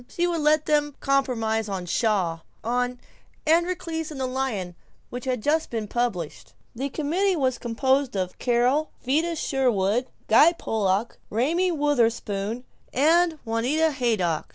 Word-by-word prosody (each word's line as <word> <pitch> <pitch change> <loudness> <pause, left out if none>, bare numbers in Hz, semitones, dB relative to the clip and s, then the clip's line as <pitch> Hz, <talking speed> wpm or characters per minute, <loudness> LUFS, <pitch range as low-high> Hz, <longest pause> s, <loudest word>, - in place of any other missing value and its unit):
She 345 - 0
would 340 -2 0
let 305 0 +3
them 295 -1 +1
compromise 225 -6 0
on 190 -2 -3
Shaw 185 -4 0 0.2
on 245 +1 -1 0.5
"Androcles 330 -1 0
and 295 -3 -7
the 260 - 0
Lion," 255 -9 -2 0.4
which 245 +1 -6
had 250 -4 -2
just 310 +2 +1
been 225 -3 -3
published. 205 -9 -3 0.2
The 270 +4 -3
committee 350 +7 0
was 260 -5 0
composed 260 +2 0
of 185 -1 -3
Carol, 250 +5 +2 0.2
Vida 320 +6 +1
Sherwin, 245 -5 +1 0.2
Guy 300 +10 +6
Pollock, 215 - -1
Raymie 330 - +1
Wutherspoon, 235 -7 0 0.3
and 325 +4 +3
Juanita 255 +8 +1
Haydock. 220 - 0
255 Hz, 130 wpm, -25 LUFS, 225-305 Hz, 0.5 s, Guy